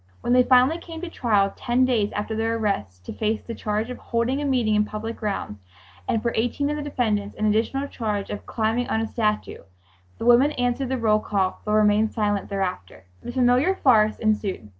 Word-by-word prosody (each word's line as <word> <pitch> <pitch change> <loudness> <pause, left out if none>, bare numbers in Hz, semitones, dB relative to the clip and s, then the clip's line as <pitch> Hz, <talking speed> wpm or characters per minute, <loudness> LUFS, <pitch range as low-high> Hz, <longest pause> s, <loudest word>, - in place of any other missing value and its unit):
When 240 - 0
they 250 - +6
finally 255 +6 +4
came 330 -1 -9
to 355 -2 -6
trial 205 -8 +1
ten 245 +2 +1
days 225 -5 +1
after 210 +2 -3
their 225 +1 0
arrest, 105 - -3
to - - -6
face 220 0 -1
the 230 - -6
charge 215 +2 -2
of 250 - -7
"holding 240 +4 -1
a - - -2
meeting 245 -6 +1
in 210 0 +3
public 215 +2 -5
grounds," 200 - -4 0.5
and 220 - 0
for 235 - 0
eighteen 265 +6 0
of - - -2
the 300 - -4
defendants 220 -8 -1
an 215 - -1
additional 230 +6 0
charge 210 -6 -3
of 205 - -7
"climbing 225 +2 -1
on 220 - 0
a - - -1
statue," 215 -2 -2 0.6
the - - -5
women 245 +5 +5
answered 245 +1 -1
the 265 - -1
roll 215 -3 +2
call 195 -3 -1
but 210 - -1
remained 215 0 +3
silent 205 -3 -1
thereafter. 185 - -4 0.2
The - - -6
familiar 255 +8 +3
farce 215 - +3
ensued. 210 - -1
225 Hz, 205 wpm, -24 LUFS, 210-250 Hz, 0.6 s, they